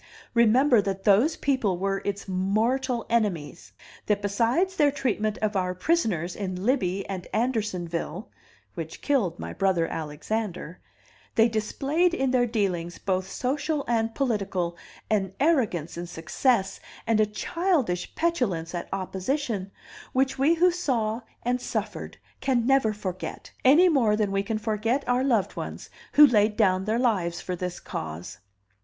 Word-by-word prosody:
Remember 235 +1 +5
that 195 -1 -3
those 220 +11 +4
people 245 -10 +1
were 195 +1 -1
its 200 0 -3
mortal 225 +7 0
enemies; 195 -9 -1 0.4
that 205 -1 +1
besides 235 - +1
their 295 -5 +4
treatment 230 -7 -1
of 210 -1 0
our 180 -1 0
prisoners 185 - 0
in 185 -1 -4
Libby 195 -7 0
and 190 -2 -5
Andersonville 195 -7 -2 0.4
(which 165 -1 -7
killed 215 - +1
my - - -6
brother 185 -4 +1
Alexander) 170 +3 -4 0.6
they 225 +1 +6
displayed 280 +10 0
in 270 -5 0
their 245 -1 +3
dealings, 185 -7 -1
both 190 -1 -2
social 285 +6 -1
and 225 -1 0
political, 195 -9 -1 0.4
an 195 -3 +1
arrogance 255 - +1
in 175 - -5
success 195 - 0 0.3
and 225 -2 +2
a 215 - +4
childish 265 - -1
petulance 215 - 0
at 175 - -4
opposition, 195 +2 -2 0.4
which 265 +1 +2
we 300 +5 +4
who 355 +2 +4
saw 245 -10 -1 0.2
and 250 +1 0
suffered - - -4 0.2
can 255 -4 +1
never 270 -4 +3
forget, 190 -3 -6
any 300 +8 +7
more 250 -11 +3
than 210 -2 0
we 195 0 +1
can 215 +2 -2
forget 225 +5 -1
our 250 +1 +2
loved 235 -8 +1
ones - - -6 0.2
who 295 - +9
laid 215 -5 +3
down 190 -3 +3
their 220 +2 +1
lives 200 -9 +1
for 180 - -4
this 180 0 -4
cause." 80 +3 -6
215 Hz, 145 wpm, -26 LUFS, 185-260 Hz, 0.6 s, who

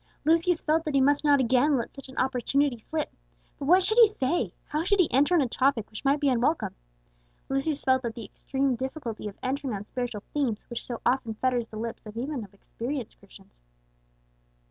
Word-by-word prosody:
Lucius 330 +2 +3
felt 315 +1 +1
that 305 -3 -2
he - - +5
must 285 +2 +3
not 290 -2 +5
again 260 +3 +3
let 235 - -4
such 275 -1 -11
an 260 - -12
opportunity 265 0 +1
slip. 310 +7 -4 0.5
But 280 - -4
what 365 +4 +6
should 435 +5 +2
he 460 - +10
say, 345 -4 -1
how 305 +1 -2
should 400 +3 +2
he 355 - +5
enter 290 +7 +4
on 335 - +5
a 265 - +1
topic 255 -3 +1
which 215 - -8
might 280 +1 +3
be 285 - +1
unwelcome? 260 +5 +1 0.8
Lucius 275 +2 -1
felt 260 -1 +3
that 235 -2 -5
extreme 265 +4 -2
difficulty 260 -4 -5
of 200 - -8
entering 265 -2 -2
on 200 +1 -6
spiritual 240 -3 -4
themes 255 -8 0
which 235 - -4
so 240 -2 -5
often 240 -3 +1
fetters 245 0 0
the 215 - -9
lips 225 0 -5
even 255 +1 -3
of 200 - -12
experienced 240 +4 -6
Christians. - - -18
265 Hz, 195 wpm, -27 LUFS, 235-295 Hz, 0.8 s, he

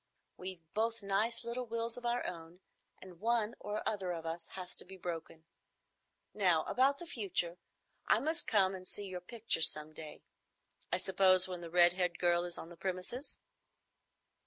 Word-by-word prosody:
"We've 185 -2 -5
both 225 0 0
nice 215 +5 0
little 240 +1 -4
wills 230 0 -2
of 245 -1 -4
our 240 +1 0
own, 170 +1 -7 0.4
and 180 -3 -12
one 230 0 +1
or 210 +1 -3
other 190 -4 -1
of 165 -1 -6
us 165 +1 -4
has 180 -1 -6
to - - +4
be 190 +1 -11
broken. 165 -2 -6 0.9
Now 180 -6 +3
about 270 +2 +3
the 345 - -6
future. 185 - -1 0.5
I - - +5
must 320 +3 0
come 195 -3 +3
and 185 -1 -8
see 205 - -3
your 185 -2 -6
pictures 190 -4 +5
some 155 0 -6
day,—I 155 +3 -8
suppose 185 0 +5
when 180 -2 -6
the 170 - -7
red 175 0 +6
haired 180 -2 -1
girl 175 0 +2
is 175 -1 -3
on 165 - -8
the 175 - -11
premises." 190 - -4
185 Hz, 170 wpm, -34 LUFS, 175-225 Hz, 0.9 s, red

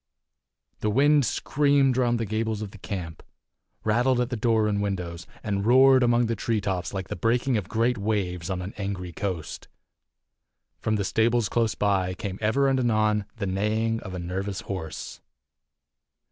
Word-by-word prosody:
The 105 - 0
wind 145 +4 +4
screamed 140 -2 +2
round 120 -2 +2
the 115 - -1
gables 110 0 -2
of 100 - -7
the 100 - -13
camp, 90 -6 -6 0.6
rattled 120 +4 +2
at 125 +1 -1
the - - 0
door 110 -1 +2
and 100 -1 0
windows, 90 -4 -4 0.2
and 100 -2 -1
roared 130 +3 +6
among 120 0 +3
the 115 0 -1
tree 115 -1 -1
tops 95 -3 -2
like 95 -2 -5
the - - -3
breaking 120 +6 +1
of 105 -5 -2
great 115 +1 +1
waves 95 -5 -2
on 90 -1 -2
an 95 - -6
angry 95 -3 -4
coast. 90 -2 -5 1.1
From 110 - 0
the 100 -2 -1
stables 115 +1 +2
close 115 -2 +1
by 95 -3 +1
came 95 0 -5
ever 130 +6 +2
and 135 -1 +2
anon 110 -3 +2
the 110 -4 -3
neighing 110 +4 0
of 95 -4 -8
a - - -4
nervous 95 +3 -4
horse. 85 -5 -6
105 Hz, 170 wpm, -26 LUFS, 95-120 Hz, 1.1 s, roared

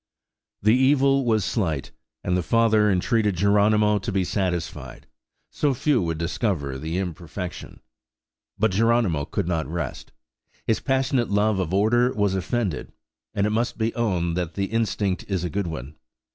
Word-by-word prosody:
The 110 +2 +5
evil 135 +1 +3
was 110 -4 +2
slight, 80 - -1 0.3
and 90 - 0
the 90 - +1
father 110 +3 +3
entreated 105 +2 +1
Geronimo 105 +2 +3
to 105 +3 -4
be 95 -1 +1
satisfied: 90 -4 -3 0.5
so 145 -3 0
few 135 -2 +2
would 80 -2 -2
discover 80 - -2
the 80 +4 -3
imperfection. 90 -1 -6 0.8
But 110 0 +2
Geronimo 105 -7 +2
could 100 +1 -3
not 80 -5 -1
rest; 80 -4 -5 0.5
his 110 - +1
passionate 130 -2 0
love 105 0 +2
of 90 -3 -2
order 115 +6 +3
was 105 -2 +1
offended; 95 - -2 0.4
and 100 - +2
it 105 - 0
must 115 +2 -1
be 115 0 0
owned 90 -8 0
that 85 -3 -3
the 100 - 0
instinct 105 -4 -1
is 95 -3 -1
a 90 - -3
good 100 -2 -1
one. 75 -3 -6
100 Hz, 155 wpm, -24 LUFS, 85-115 Hz, 0.8 s, The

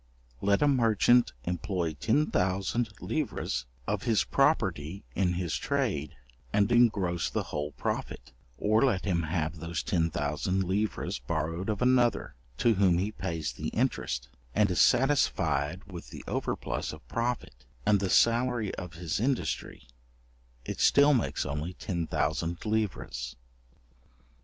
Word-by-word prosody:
Let 100 +6 +3
a - - +5
merchant 120 -2 +4
employ 90 0 -2
10,000 100 - +1
livres - - -2 0.2
of - - -1
his 110 -4 +2
property 80 +7 +1
in 90 -2 +1
his 85 -2 -2
trade, 75 +1 -1 0.4
and 105 +2 +2
engross 100 -8 +3
the - - -1
whole 75 0 -2
profit, - - -4 0.3
or 110 +3 +3
let 110 -9 +2
him 90 -4 +1
have 80 0 -2
those 85 -1 -3
10,000 80 +2 0
livres 95 - -1
borrowed 80 - -2
of 105 +1 0
another, 125 -2 +2 0.2
to 115 - +4
whom 95 -4 +3
he 100 +4 -1
pays 85 -7 -3
the - - -5
interest, - - -1 0.3
and 105 -3 +3
is 90 - +3
satisfied 120 - +2
with 90 -3 -9
the - - -9
overplus - - -2
of 75 - -13
profit, 115 - -3 0.2
and 105 -1 +4
the 95 -1 -1
salary 115 -1 +3
of 90 -3 -7
his 85 -1 -2
industry, 125 - -2 0.8
it - - -5
still 145 +1 +6
makes 125 - 0
only 75 +5 -3
10,000 85 -2 -2
livres. 105 - -2
95 Hz, 130 wpm, -29 LUFS, 80-110 Hz, 0.8 s, still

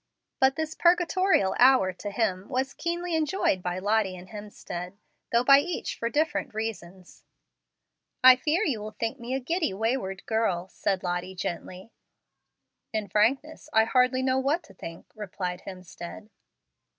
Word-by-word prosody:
But 265 0 +4
this 315 0 -3
purgatorial 350 - +3
hour 250 -7 +5
to 205 +3 -6
him 200 -3 -1
was 265 +1 -1
keenly 345 0 -2
enjoyed 310 - +1
by 180 0 -3
Lottie 205 0 +1
and 180 +1 -12
Hemstead, 200 -3 -8 0.3
though 235 +1 +3
by 275 +2 +8
each 335 +3 -3
for 230 - -1
different 295 -4 -1
reasons. 190 -5 -6 1.0
"I 255 0 +10
fear 305 +9 0
you 215 -7 -3
think 230 +4 -2
me 240 +2 -3
a - - 0
giddy, 315 - -1
wayward 215 -3 -2
girl," 190 -5 0
said 190 -1 -2
Lottie 180 +1 -3
gently. 180 +3 -6 1.0
"In 215 -2 -3
frankness, 275 +9 0
I 220 - +6
hardly 255 +2 +2
know 260 0 +2
what 295 +6 0
to - - -17
think," 165 0 -9
replied 185 -3 -5
Hemstead. 185 +3 -9
225 Hz, 145 wpm, -27 LUFS, 190-275 Hz, 1.0 s, I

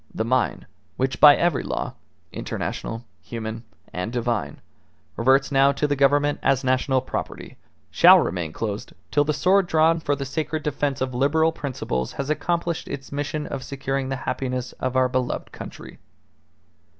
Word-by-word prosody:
The 110 - -1
mine, 130 +1 0 0.3
which 130 +1 -1
by 145 -1 +9
every 170 -6 +1
law, - - -3 0.4
international, 115 +1 -5 0.2
human, 110 +4 -6 0.3
and 90 +5 -3
divine, 120 -2 -2 0.6
reverts 135 +3 +3
now 135 0 +5
to 145 - -1
the 145 -1 +1
Government 145 +1 +3
as 135 -1 +2
national 130 0 +2
property, 130 - -6 0.4
shall - - +8
remain 85 -3 -1
closed 105 +3 -4 0.2
till 145 - +3
the 150 - +1
sword 185 +4 +3
drawn 160 +1 +3
for 145 -3 0
the 140 0 -5
sacred 155 +3 -3
defence 145 -2 -1
of 130 -1 -1
liberal 155 +6 +2
principles 130 - -3
has 140 +2 -3
accomplished 170 +2 -1
its 135 -1 -7
mission 145 +1 -3
of 135 - -5
securing 135 -1 -3
the 135 - -1
happiness 130 -1 -2
of 130 - -2
our 130 0 +4
beloved 125 0 -2
country." - - -10
135 Hz, 155 wpm, -24 LUFS, 125-145 Hz, 0.6 s, by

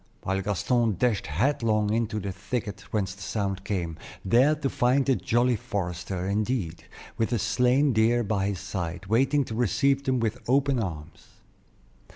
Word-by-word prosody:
while 95 +1 -1
Gaston 110 +3 +1
dashed 120 -1 +1
headlong 110 - +1
into 110 -1 0
the 100 -1 -4
thicket 105 +1 -4
whence 95 -3 -1
the 100 - -15
sound 95 -2 -2
came, 85 -6 -3 0.3
there 130 +10 +4
to 145 -2 -2
find 135 0 +2
the 135 - +3
jolly 120 +1 +2
forester, 90 -2 -4
indeed, 100 -3 -2 0.3
with 115 +1 +1
a 120 - +2
slain 125 +6 +2
deer 115 +2 +3
by 100 -2 0
his 100 -3 -2
side, 90 -2 -5
waiting 135 +7 +2
to 110 - -6
receive 130 +5 +1
them 130 -2 +1
with 115 +1 -1
open 135 0 +3
arms. 85 -4 -6
110 Hz, 160 wpm, -26 LUFS, 95-125 Hz, 0.3 s, there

